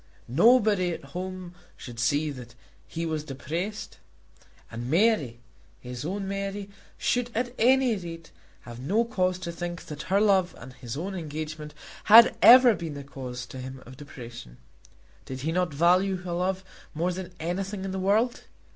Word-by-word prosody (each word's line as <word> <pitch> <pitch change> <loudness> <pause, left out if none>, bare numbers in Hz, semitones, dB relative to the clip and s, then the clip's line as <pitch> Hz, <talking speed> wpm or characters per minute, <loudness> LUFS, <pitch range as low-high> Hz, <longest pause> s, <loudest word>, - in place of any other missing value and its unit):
Nobody 205 - +4
at 165 - -8
home 185 -1 -6 0.2
should 120 -2 -9
see 145 +6 +1
that 125 -3 -10 0.3
he 165 0 -4
was 155 -2 -2
depressed. 165 +9 -5 0.7
And 120 +2 -5
Mary, 160 - +2 0.4
his 125 -1 -7
own 195 +5 -3
Mary, 195 0 -4 0.3
should 245 -1 0
at 245 +1 -1
any 255 0 +4
rate 165 -3 -8 0.3
have 120 0 -10
no 205 - +1
cause 185 -5 0
to 185 -2 -5
think 175 0 -6
that 150 -1 -7
her 195 +1 +4
love 195 -4 +3
and 125 +2 -11
his 125 0 -7
own 190 +5 -4
engagement 155 -2 -6 0.3
had 230 +2 +9
ever 250 0 +9
been 165 -6 -5
the 140 - -7
cause 125 -3 -7
to 130 - -10
him 130 +1 -8
of 130 - -12
depression. 120 - -11 0.7
Did 130 0 -7
he 160 +4 -1
not 180 0 0
value 180 +6 +3
her 175 -1 -4
love 185 +2 -1 0.3
more 170 +4 0
than 180 0 -7
anything 190 +4 -3
in 190 - -3
the 190 - -3
world? 215 +6 +1
175 Hz, 165 wpm, -27 LUFS, 140-195 Hz, 0.7 s, had